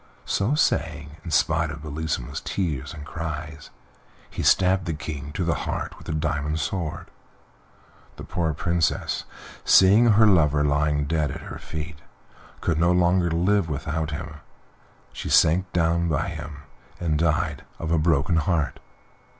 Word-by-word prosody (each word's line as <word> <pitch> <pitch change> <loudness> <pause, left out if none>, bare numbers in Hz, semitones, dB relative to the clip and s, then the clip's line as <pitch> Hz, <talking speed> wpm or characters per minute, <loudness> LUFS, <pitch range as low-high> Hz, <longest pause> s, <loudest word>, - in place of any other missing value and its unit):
So 110 +9 +1
saying, 75 - 0
in 85 - -6
spite 80 +2 +2
of 75 0 -7
Bellissima's 75 -4 -3
tears 75 -8 -3
and 75 -4 -9
cries, 75 -2 -6 0.6
he - - -4
stabbed 95 0 +3
the 80 -3 -2
King 75 -1 -6
to 90 - -2
the 85 0 +1
heart - - -4
with - - -14
the - - -3
diamond 75 0 -1
sword. 85 -1 -3 1.0
The - - -9
poor 80 -3 -2
Princess, 85 0 0 0.4
seeing 100 +5 +6
her 110 +2 +6
lover 75 -7 +4
lying 75 0 +1
dead 75 -1 0
at - - -6
her - - -8
feet, 80 -1 -7 0.6
could 80 -2 0
no 85 +1 +4
longer 90 0 +3
live 90 +2 +1
without 75 +1 -2
him; 75 - -6 0.8
she - - -5
sank 90 +4 +4
down 85 0 +1
by 80 +5 0
him 75 -3 -8 0.4
and 80 -3 0
died 80 -1 0
of 80 0 -4
a 85 - +3
broken 80 +1 +2
heart. 80 -2 0
80 Hz, 150 wpm, -24 LUFS, 75-85 Hz, 1.0 s, seeing